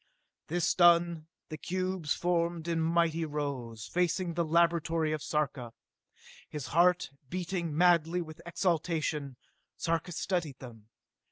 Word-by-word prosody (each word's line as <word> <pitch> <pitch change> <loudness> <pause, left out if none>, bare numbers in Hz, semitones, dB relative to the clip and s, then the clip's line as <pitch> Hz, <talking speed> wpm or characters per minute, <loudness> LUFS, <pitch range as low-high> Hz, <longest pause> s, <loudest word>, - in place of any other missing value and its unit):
This 175 +1 +1
done, 170 -2 +4 0.2
the 155 -1 -6
cubes 185 -3 -2
formed 170 -1 0
in 165 -1 0
mighty 165 0 +2
rows, 140 -8 -4
facing 175 - 0
the 170 +1 0
laboratory 165 -1 +2
of 155 -1 -2
Sarka. 140 -7 -2 0.8
His 150 -4 -6
heart 175 -1 +4 0.2
beating 175 -3 -3
madly 175 0 +4
with 155 -1 -11
exultation, 165 -5 -1 0.4
Sarka 165 +1 -1
studied 170 -5 -2
them. 115 -4 -12
165 Hz, 115 wpm, -30 LUFS, 150-175 Hz, 0.8 s, done